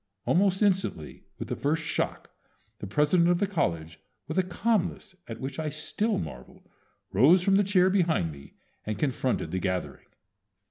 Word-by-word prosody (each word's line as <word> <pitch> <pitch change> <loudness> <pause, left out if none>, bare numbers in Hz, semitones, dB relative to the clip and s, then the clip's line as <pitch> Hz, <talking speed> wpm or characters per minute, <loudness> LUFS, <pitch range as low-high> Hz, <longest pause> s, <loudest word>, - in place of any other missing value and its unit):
Almost 190 +2 +2
instantly 190 - -1
with - - -6
the - - -3
first 155 +3 -1
shock 155 - -3 0.5
the 100 - -6
president 150 - +3
of 175 - +3
the 200 - +1
college, 85 - -2 0.3
with 160 +4 -1
a - - +6
calmness 190 +1 -1
at 115 -1 -7
which 135 +5 -5
I 155 -1 -2
still 205 +9 -1
marvel, 65 -6 -8 0.5
rose 155 - +5
from 195 +1 +3
the 205 - +4
chair 185 -2 +3
behind 165 - +1
me 70 -1 -14 0.3
and 110 -1 -4
confronted 130 0 -1
the 95 - -1
gathering. 95 -1 -3
160 Hz, 165 wpm, -27 LUFS, -, 0.5 s, a